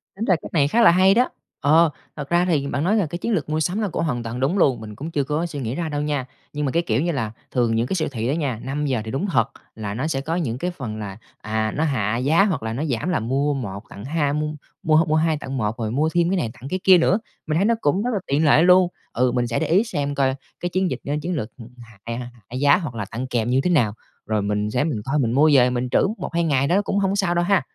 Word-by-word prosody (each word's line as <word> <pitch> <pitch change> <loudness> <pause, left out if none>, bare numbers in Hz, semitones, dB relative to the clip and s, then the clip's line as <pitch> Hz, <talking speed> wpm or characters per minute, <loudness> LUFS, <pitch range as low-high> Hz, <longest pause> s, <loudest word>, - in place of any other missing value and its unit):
Tính 215 +4 -3
ra 185 - +4
cách - - -10
này 145 -4 +3
khá 235 +11 +2
là 220 - +8
hay 185 +2 +5
đó. 245 +4 +3 0.3
Ờ, 160 +3 +5 0.3
thật 145 -2 -6
ra 175 +1 +3
thì 150 -6 +1
bạn 140 +2 -2
nói 205 +5 +2
là 200 -6 +2
cái 170 +3 -5
chiến 230 +6 -3
lược 175 - -1
mua 155 +1 0
sắm 180 +6 0
là 210 - 0
cũng 165 - -2
hoàn 125 -7 -2
toàn 115 +2 -5
đúng 145 +10 +1
luôn, 135 -8 +3
mình 105 -1 -8
cũng 155 +8 -6
chưa 145 -3 0
có 150 +5 -1
suy 150 -4 -5
nghĩ 120 0 -3
ra 165 0 -2
đâu 145 -1 -2
nha. 145 -3 -1 0.3
Nhưng 150 0 -2
mà 135 - 0
cái 170 +1 +1
kiểu 115 -1 0
như 170 +2 0
là 115 -7 -2 0.2
thường 120 -3 +1
những 115 +2 +1
cái 190 - -1
siêu 165 - 0
thị 115 -1 -3
á 135 - +1
nha, 135 -9 -2
5:00 135 -2 -1
thì 110 - -5
đúng 155 +10 -1
thật 115 -6 +2 0.3
là 105 -2 -4
nó 130 +8 -2
sẽ 135 -4 -1
có 160 +4 -2
những 125 -9 -2
cái 180 +6 -2
phần 115 -10 -6
là, 100 -2 -6 0.2
à, 110 0 -2
nó 155 - 0
hạ 115 -7 0
giá 150 +10 +3
hoặc 175 - -1
là 110 0 -3
nó 140 +6 -2
giảm 135 +5 -2
là 175 - +1
mua 135 +5 0
1 100 -6 -5
tặng 100 - -9
hai 145 -1 0
mua 150 0 -1 0.4
mua 155 -1 +3
h 160 +1 +4
mua 155 - +2
2 160 -1 +2
tặng 135 -2 -5
1, 110 0 -1
rồi 110 -3 -2
mua 150 +6 +1
thêm 170 -1 +2
cái 190 - +1
này 120 -10 -1
tặng 125 +4 -10
cái 185 - -2
kia 185 -2 +7
nữa. 190 +5 +3 0.3
Mình 155 - 0
thấy 195 - +2
nó 230 - +4
cũng 180 +8 +1
rất 245 - -1
là 205 - 0
tiện 145 +3 +2
lợi 150 +2 +5
luôn. 180 0 +6 0.3
Ừ, 125 +1 +2
mình 120 -1 0
sẽ 115 - -1
để 160 - -1
ý 185 +8 +4
xem 145 -9 -3
coi 135 -1 +1 0.2
cái 175 - -2
chiến 185 +1 0
dịch - - -3
a, 145 - -2
chiến 175 0 -2
lược 115 -6 -3
h - - -11 0.2
hạ, 115 -3 -14
à, 120 +1 -5 0.2
hạ 125 - -7
giá 145 0 +5
hoặc 155 -10 -5
là 105 -3 -3
tặng 125 +4 -4
kèm 120 -2 -1
như 130 +2 +3
thế 180 - +1
nào, 120 -12 +3 0.3
rồi 110 -1 0
mình 105 +1 -1
sẽ 125 +4 +1
mình 140 -10 -2
coi 145 +2 0
mình 115 -3 +1
mua 150 +5 +4
về 125 -2 +6
mình 125 0 -2
trữ - - +3
1-2 170 0 -2
ngày 140 -4 +2
đó 185 +6 +3
cũng 200 0 -1
hông 195 0 +1
sao 190 -4 +1
đâu 175 - +2
ha. 195 -5 +3
145 Hz, 305 wpm, -22 LUFS, 120-170 Hz, 0.4 s, là